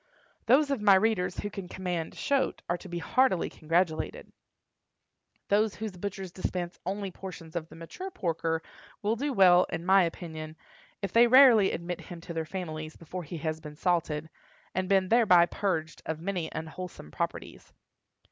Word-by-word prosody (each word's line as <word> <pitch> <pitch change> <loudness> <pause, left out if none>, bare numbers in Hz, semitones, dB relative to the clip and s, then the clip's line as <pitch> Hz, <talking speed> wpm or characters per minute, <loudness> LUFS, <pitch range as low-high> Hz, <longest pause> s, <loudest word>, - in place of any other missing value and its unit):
Those 280 +4 +5
of 270 -6 -1
my 205 -2 +7
readers 190 -3 +1
who 205 - -4
can 195 -3 -6
command 175 -3 -3
"shoat" 275 -1 0
are 175 - 0
to 190 - -11
be 175 - -4
heartily 190 +2 +2
congratulated. 170 - -1 1.2
Those 210 +1 +2
whose 220 -1 -4
butchers 195 0 -5
dispense 180 -1 -4
only 195 0 -3
portions 170 -3 -9
of 165 -1 -3
the - - -13
mature 165 - -7
porker 165 - -2 0.4
will 215 +2 +1
do 285 +5 -2
well, 185 -6 +6
in 165 +1 -4
my 190 +1 +6
opinion, 160 -2 -4 0.5
if 195 - -3
they 235 +1 +7
rarely 240 -5 +7
admit 170 +1 -4
him 175 - -9
to 170 - -7
their 160 -1 -2
families 155 -3 -5
before 180 +2 -7
he 165 +1 -7
has 155 0 -3
been 150 -1 -10
salted, 160 -3 0 0.5
and 185 0 -1
been 190 -2 +3
thereby 205 -7 +6
purged 165 -4 -2
of 160 -1 -3
many 180 -1 -3
unwholesome 160 - -7
properties. - - -5
180 Hz, 165 wpm, -29 LUFS, 165-200 Hz, 1.2 s, my